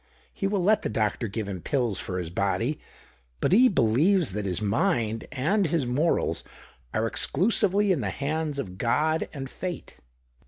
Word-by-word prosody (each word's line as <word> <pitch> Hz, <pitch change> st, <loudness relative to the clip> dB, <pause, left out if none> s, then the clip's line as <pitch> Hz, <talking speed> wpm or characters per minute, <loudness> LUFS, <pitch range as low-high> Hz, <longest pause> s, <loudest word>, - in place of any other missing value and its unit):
He 195 Hz, -, -2 dB
will 195 Hz, -2 st, 0 dB
let 210 Hz, +3 st, +4 dB
the -, -, -2 dB
doctor 110 Hz, +2 st, -1 dB
give 105 Hz, 0 st, -4 dB
him 95 Hz, -3 st, -5 dB
pills 120 Hz, -, -1 dB
for 90 Hz, -, -4 dB
his 85 Hz, -2 st, -4 dB
body; 115 Hz, -, -1 dB, 0.6 s
but -, -, +1 dB
he 250 Hz, +7 st, +6 dB
believes 155 Hz, -, +3 dB
that 105 Hz, +1 st, -3 dB
his 90 Hz, -, -1 dB
mind 110 Hz, -, 0 dB
and 165 Hz, +10 st, +1 dB
his 155 Hz, -3 st, 0 dB
morals 125 Hz, -, 0 dB, 0.5 s
are 110 Hz, -, 0 dB
exclusively 200 Hz, -, +2 dB
in 165 Hz, -8 st, +1 dB
the 100 Hz, -, -1 dB
hands 150 Hz, +4 st, -2 dB
of 95 Hz, -8 st, -5 dB
God 155 Hz, +7 st, +1 dB
and 135 Hz, -3 st, -6 dB
fate." 180 Hz, +6 st, -7 dB
135 Hz, 165 wpm, -26 LUFS, 110-175 Hz, 0.6 s, he